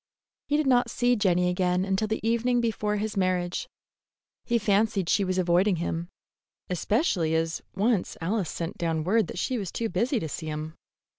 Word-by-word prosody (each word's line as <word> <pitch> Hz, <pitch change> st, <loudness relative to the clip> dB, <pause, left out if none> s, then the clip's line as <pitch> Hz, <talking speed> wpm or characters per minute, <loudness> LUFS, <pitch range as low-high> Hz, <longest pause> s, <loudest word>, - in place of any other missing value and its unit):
He 295 Hz, -, +2 dB
did 305 Hz, -, +1 dB
not 245 Hz, -2 st, +3 dB
see 245 Hz, +1 st, +2 dB
Jenny 180 Hz, -4 st, +2 dB
again 180 Hz, 0 st, +1 dB
until 195 Hz, +2 st, 0 dB
the 220 Hz, +1 st, -2 dB
evening 240 Hz, +2 st, +2 dB
before 215 Hz, -3 st, 0 dB
his 210 Hz, 0 st, -2 dB
marriage. 185 Hz, -2 st, 0 dB, 0.8 s
He 235 Hz, -, +2 dB
fancied 205 Hz, -3 st, +1 dB
she 200 Hz, -, +3 dB
was 185 Hz, -1 st, -1 dB
avoiding 180 Hz, +2 st, +3 dB
him, 170 Hz, 0 st, -3 dB, 0.6 s
especially 180 Hz, -, +1 dB
as 165 Hz, +1 st, -1 dB
once 205 Hz, 0 st, +1 dB
Alice 185 Hz, +1 st, -1 dB
sent 165 Hz, -1 st, -5 dB
down 165 Hz, -2 st, 0 dB
word 215 Hz, +6 st, +2 dB
that -, -, -7 dB
she 255 Hz, -3 st, -1 dB
was 195 Hz, -5 st, -4 dB
too 230 Hz, -1 st, -2 dB
busy 240 Hz, +3 st, 0 dB
to 160 Hz, -, -4 dB
see 160 Hz, +2 st, -6 dB
him. 155 Hz, +1 st, -4 dB
195 Hz, 175 wpm, -27 LUFS, 175-225 Hz, 0.8 s, not